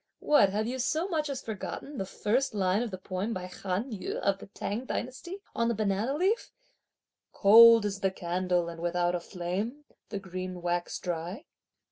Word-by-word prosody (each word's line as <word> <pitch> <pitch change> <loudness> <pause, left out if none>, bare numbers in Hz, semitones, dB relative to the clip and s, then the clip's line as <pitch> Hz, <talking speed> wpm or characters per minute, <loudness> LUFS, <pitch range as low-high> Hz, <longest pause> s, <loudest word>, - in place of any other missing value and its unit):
What, 290 -10 +4
have 210 +3 -1
you 255 +3 -3
so 310 +7 0
much 310 -5 -1
as 270 -2 -4
forgotten 230 +6 -6
the 190 - -3
first 235 +6 0
line 190 +1 +2
of 240 - -2
the 190 - -6
poem 185 +4 -3
by 185 -1 -4
Han 190 +6 -3
Yü, 210 - -4
of 195 -1 0
the - - -10
T'ang 210 +5 -4
dynasty, 260 +10 -4 0.2
on 230 0 +1
the 235 - +1
Banana 215 +5 0
leaf: 385 +9 +1 0.8
"Cold 230 +2 +8
is 200 -1 -2
the 195 - +2
candle 180 -1 -1
and 165 -1 -7
without 175 0 +1
a 175 - 0
flame, 195 +11 -4 0.2
the 205 - -3
green 185 -2 -6
wax 175 0 -1
dry?" 175 - -4
200 Hz, 180 wpm, -29 LUFS, 185-240 Hz, 0.8 s, Cold